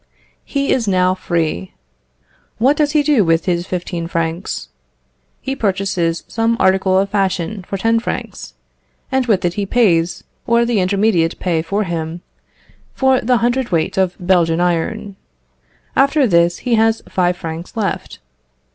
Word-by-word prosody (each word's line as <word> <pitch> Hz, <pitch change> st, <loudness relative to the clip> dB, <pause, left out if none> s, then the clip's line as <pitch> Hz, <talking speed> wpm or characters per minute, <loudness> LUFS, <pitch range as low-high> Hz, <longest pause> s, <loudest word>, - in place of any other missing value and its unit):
He 280 Hz, -1 st, -1 dB
is 240 Hz, -4 st, -1 dB
now 185 Hz, -1 st, +3 dB
free. 165 Hz, -, -2 dB, 0.8 s
What 265 Hz, +6 st, +3 dB
does 295 Hz, -1 st, +1 dB
he 300 Hz, -1 st, +3 dB
do 285 Hz, -8 st, +3 dB
with 165 Hz, -1 st, +1 dB
his 175 Hz, -1 st, -1 dB
fifteen 175 Hz, -2 st, -4 dB
francs? 165 Hz, 0 st, -3 dB, 0.7 s
He 270 Hz, -, -3 dB
purchases 190 Hz, -6 st, -1 dB
some 225 Hz, +1 st, 0 dB
article 190 Hz, 0 st, +3 dB
of 195 Hz, +1 st, +1 dB
fashion 195 Hz, -1 st, -1 dB
for 195 Hz, -, -3 dB
ten 225 Hz, +3 st, +2 dB
francs, 230 Hz, -, -6 dB, 0.6 s
and 265 Hz, -1 st, +1 dB
with 200 Hz, -6 st, +2 dB
it 175 Hz, -, 0 dB
he 205 Hz, +1 st, -2 dB
pays 180 Hz, -7 st, +2 dB, 0.2 s
(or 235 Hz, 0 st, +3 dB
the 235 Hz, -3 st, +1 dB
intermediate 185 Hz, -3 st, +1 dB
pay 170 Hz, -3 st, 0 dB
for 200 Hz, +6 st, -1 dB
him) 165 Hz, -1 st, -4 dB, 0.7 s
for 265 Hz, -1 st, +3 dB
the 250 Hz, +2 st, +2 dB
hundred 245 Hz, +1 st, 0 dB
weight 165 Hz, -3 st, 0 dB
of 190 Hz, -2 st, +1 dB
Belgian 175 Hz, -2 st, +2 dB
iron. 180 Hz, +4 st, -1 dB, 0.8 s
After 280 Hz, +1 st, +3 dB
this 170 Hz, -4 st, +3 dB
he 245 Hz, -, +1 dB
has 225 Hz, 0 st, +2 dB
five 180 Hz, -1 st, 0 dB
francs 165 Hz, +5 st, -7 dB
left. 210 Hz, -3 st, -3 dB
190 Hz, 145 wpm, -18 LUFS, 170-225 Hz, 0.8 s, now